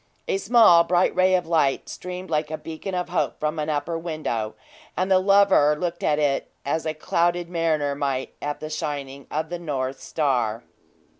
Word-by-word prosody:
A 425 -5 0
small, 220 - +6
bright 175 +2 +2
ray 185 +1 +4
of 180 -2 0
light 155 -5 +1
streamed 180 0 -7
like 150 -1 0
a 155 - -3
beacon 165 +5 -6
of 180 0 -2
hope - - -1
from 155 +1 -2
an 150 +1 -2
upper 155 +2 -2
window, 155 -10 -3 0.4
and 185 +1 0
the 185 - +6
lover 195 -6 +5
looked 175 0 -3
at 150 - +2
it 145 -2 0 0.2
as 160 +3 -1
a 155 - -2
clouded 170 +2 0
mariner 155 -4 0
might 140 -2 -2
at 145 0 -4
the 155 0 -6
shining 140 -3 -5
of 155 +1 -2
the 175 0 -4
North 135 -5 -3
Star. 125 -7 -1
155 Hz, 180 wpm, -24 LUFS, 145-175 Hz, 0.4 s, small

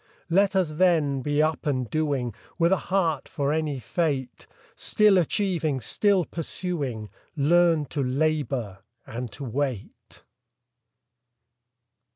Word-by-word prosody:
Let 195 +2 +3
us, 185 -5 +2
then, 155 -5 +2
be 145 +3 +1
up 155 -1 -1
and 130 -4 0
doing, 140 -3 -1 0.2
With 170 +1 +3
a - - +6
heart 170 -7 +1
for 145 -1 -1
any 155 -3 -1
fate; 135 -1 -2 0.3
Still 210 -3 +4
achieving, 165 -5 0
still 195 - +2
pursuing, 145 - -4 0.2
Learn 165 +1 +3
to 145 - -2
labor 135 -6 -1 0.3
and 120 0 -6
to 145 - -8
wait. 130 -3 -4
150 Hz, 115 wpm, -25 LUFS, 135-170 Hz, 0.3 s, a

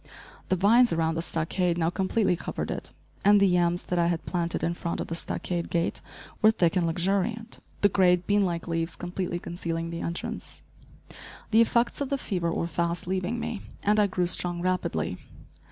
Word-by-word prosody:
The 185 - +3
vines 230 +7 +5
around 165 0 +1
the 165 - -2
stockade 170 +2 -1
now 165 0 +1
completely 190 +1 +1
covered - - -4
it, - - -5 0.3
and 205 +1 +6
the 200 - +5
yams 175 -1 +2
that 180 - -1
I 170 - +3
had 170 -1 -1
planted 170 -2 -2
in 170 - +1
front 170 0 -4
of - - -4
the - - -3
stockade 170 +1 -3
gate 170 0 0 0.4
were 215 - +7
thick 180 -6 +2
and 175 -2 +2
luxuriant, 200 +7 -1 0.2
the 205 - +6
great, 180 -2 +3
bean 205 0 +3
like 170 -2 -2
leaves 165 0 -1
completely 175 0 -3
concealing 165 -1 -4
the 170 - -5
entrance. 170 +1 -5 0.9
The 225 +1 +6
effects 235 +3 +2
of 280 - -1
the 280 - 0
fever 180 -9 -2
were 165 - -1
fast 170 +1 -2
leaving 185 +5 -2
me, 220 -3 -4 0.2
and 210 +1 +3
I 205 - +4
grew 180 -2 0
strong 175 0 +2
rapidly. 185 0 -1
180 Hz, 185 wpm, -27 LUFS, 170-200 Hz, 0.9 s, were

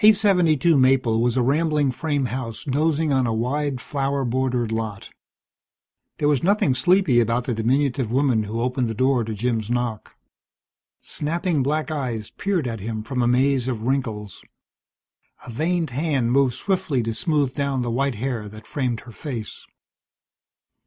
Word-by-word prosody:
872 180 -8 +4
Maple 130 -4 +3
was 120 +1 +1
a 125 - +3
rambling 150 +1 +2
frame 145 0 -1
house 115 -2 -5
dozing 150 +2 +1
on 130 -2 +2
a 115 - 0
wide 135 +3 -1
flower 140 0 -2
bordered 125 -2 0
lot. 110 -3 -4 1.1
There 145 - +1
was 145 -3 +2
nothing 190 -7 +2
sleepy 175 -2 +3
about 115 +1 +1
the 120 - -2
diminutive 125 +2 0
woman 125 -4 +2
who 115 +3 -3
opened 125 0 0
the 115 - -4
door 130 +1 +2
to 110 0 -4
Jim's 110 0 -1
knock. 120 -3 -3 0.9
Snapping 165 0 -1
black 155 +4 -1
eyes 120 -8 -3
peered 190 -7 -1
at 115 -2 -4
him 110 +2 -4
from 125 +2 -2
a 120 - +2
maze 130 +1 +2
of 115 -4 -3
wrinkles. 115 -6 -2 1.0
A 125 - -8
veined 160 +4 -1
hand 135 -3 0
moved 135 -2 +3
swiftly 165 - -1
to 115 0 -2
smooth 145 -1 0
down 140 -3 -1
the 120 - -2
white 135 +1 0
hair 115 -2 -3
that 110 +1 -12
framed 125 -4 -2
her 120 - -12
face. 115 -4 -6
130 Hz, 160 wpm, -23 LUFS, 115-145 Hz, 1.1 s, 872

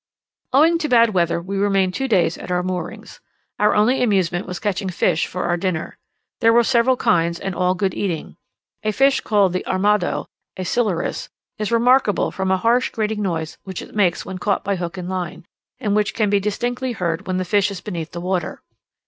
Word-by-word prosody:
Owing 320 +5 +4
to 305 -2 -2
bad 230 -2 +5
weather 170 -3 +1
we 190 +3 -5
remained 195 -2 +2
two 270 +5 -2
days 185 -8 +2
at - - -9
our 180 0 0
moorings. 180 -1 -5 0.4
Our 210 - +3
only 225 +5 +3
amusement 190 -6 +1
was 180 - -4
catching 200 -2 -2
fish 175 -2 +1
for 180 - -4
our 175 - 0
dinner: 170 -2 -3 0.4
there 230 -1 +5
were 235 +1 +5
several 250 +1 +3
kinds, 170 -3 +1
and 195 - -4
all 180 +1 +1
good 190 -1 -1
eating. 175 -6 -3 0.5
A 215 0 -1
fish 270 +4 +3
called 200 -4 +2
the 185 - -2
"armado" 200 0 +1 0.3
(a 185 - -3
Silurus) 205 -6 -1 0.3
is 215 +1 -2
remarkable 235 -2 +3
from 190 -1 -2
a 190 - +3
harsh 235 +6 +2
grating 215 -1 -2
noise 165 -5 -3
which 190 -2 -6
it - - -13
makes 190 -5 +1
when 190 -1 -6
caught 200 +1 0
by 200 0 0
hook 175 0 -5
and 180 -1 -5
line, 180 -1 -4 0.3
and 205 -2 0
which 210 -2 0
can 215 -3 +1
be 205 - +4
distinctly 245 +5 -2
heard 170 -6 -3
when 185 -1 -1
the 185 - -1
fish 205 +2 +2
is 195 -2 -6
beneath 170 -5 -6
the 170 - -6
water. 180 -2 -3
195 Hz, 200 wpm, -21 LUFS, 180-215 Hz, 0.5 s, bad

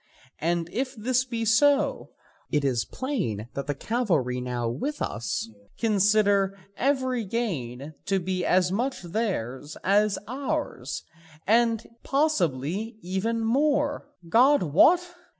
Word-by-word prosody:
And 170 +1 0
if 260 +2 -2
this 250 +3 +1
be 230 -3 -3
so, 280 +6 +3 0.4
it 145 -1 +1
is 120 -4 +1
plain 145 - -3
that 140 - -4
the 145 - -1
cavalry 155 - 0
now 125 -1 -2
with 275 - -3
us 115 +1 -2 0.3
consider 205 -2 +3 0.2
every 260 -3 0
gain 155 - -3
to 195 -1 +2
be 185 0 -2
as 180 0 +3
much 245 +3 -1
theirs 160 - -3
as 205 +1 +3
ours, 270 - -3 0.4
and 230 +1 +3 0.2
possibly 210 - 0
even 195 +6 -1
more, 285 +5 +1 0.2
God 260 - +5
wot! 190 - +5
210 Hz, 115 wpm, -26 LUFS, 155-250 Hz, 0.4 s, God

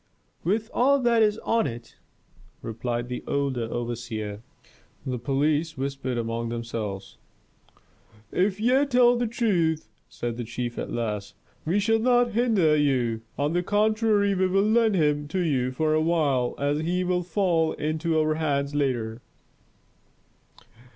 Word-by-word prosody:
"With 215 +6 -1
all 275 +3 +4
that 235 -2 +3
is 210 -1 +3
on 230 0 +1
it," 115 -2 -9 0.7
replied 120 +1 -3
the 125 0 -5
elder 135 -4 -1
overseer. 115 -3 -4 0.6
The 125 -2 -3
police 145 +5 0
whispered 135 -2 -3
among 115 0 -2
themselves. 115 -4 -5 1.1
"If 190 +2 +1
ye 255 +5 +3
tell 245 -2 +5
the 240 0 0
truth," 175 - 0 0.2
said 120 -1 -4
the 120 - -3
chief 120 +1 -4
at - - -4
last, 105 -4 -3 0.3
"we 175 +6 +1
shall 225 +2 +2
not 245 0 +3
hinder 210 -9 +3
you. 125 -6 +1 0.2
On 145 +2 0
the 175 - +2
contrary, 210 +1 +2
we 185 0 +2
will 195 +2 +2
lend 220 0 +3
him 150 -3 +1
to 185 +6 -2
you 135 -7 0
for 155 +4 0
a 155 - +2
while, 150 -7 +1
as 145 +1 0
he 175 +3 0
will 180 0 0
fall 170 -2 +1
into 160 +2 -1
our 155 0 +2
hands 145 -2 -1
later." 120 -5 -1
155 Hz, 145 wpm, -25 LUFS, 125-200 Hz, 1.1 s, tell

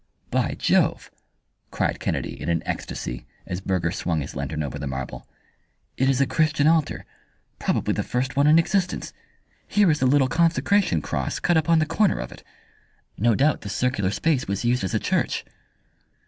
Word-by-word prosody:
"By - - 0
Jove!" - - +1 0.6
cried - - -1
Kennedy - - -3
in - - -3
an 85 -1 0
ecstasy, 60 - -5 0.2
as 90 +2 -4
Burger 90 -3 0
swung 85 -3 -1
his 70 - -7
lantern 75 +3 -3
over 70 - -5
the 70 - -4
marble. 65 0 -6 0.7
"It 130 +1 +2
is 135 -1 +2
a 140 - +4
Christian 155 0 +1
altar 160 -1 +2 0.5
probably - - 0
the - - -1
first 130 +2 -2
one 140 +1 +4
in 155 +2 +7
existence. 180 +2 0 0.5
Here 205 -5 +4
is 150 - 0
the 130 - +3
little 135 0 +4
consecration 165 - +2
cross - - -2
cut 175 - +2
upon 160 +1 +3
the 155 - +3
corner 195 +6 +2
of - - -5
it. - - -13 0.7
No 115 +1 +2
doubt 145 +4 +2
this 100 - -5
circular 125 -7 0
space 135 +6 0
was 100 +4 -2
used 120 -1 +1
as 95 - -2
a - - +2
church." - - -1
130 Hz, 175 wpm, -24 LUFS, -, 0.7 s, in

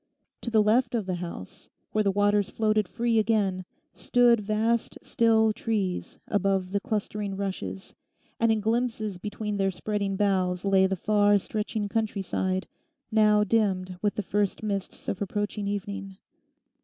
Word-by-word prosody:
To - - -3
the 220 -2 +4
left 240 +4 +2
of 220 -4 -1
the 185 -1 -2
house, 170 - -8 0.2
where 215 - +2
the 200 - +2
waters 205 0 +2
floated 215 -2 +1
free 230 +3 +1
again, 205 -4 +1 0.3
stood 240 -2 +3
vast, 220 +3 0
still 220 -1 +3
trees 205 -5 -2
above 195 -2 0
the 200 - +1
clustering 210 -3 -3
rushes; 100 - -5 0.5
and 230 0 +3
in 220 -1 +1
glimpses 220 -3 -1
between 210 +1 -4
their 195 -1 +2
spreading 200 +1 -2
boughs 190 -2 +1
lay 190 -1 +4
the 190 - -1
far 205 +2 +3
stretching 210 +1 -3
countryside, 195 -3 -1 0.4
now 210 -1 +4
dimmed 190 -4 0
with 205 -1 0
the 210 - -2
first 205 +2 -1
mists 200 -3 -4
of 190 - -3
approaching 205 +1 -2
evening. 200 -1 -4
205 Hz, 145 wpm, -27 LUFS, 195-215 Hz, 0.5 s, the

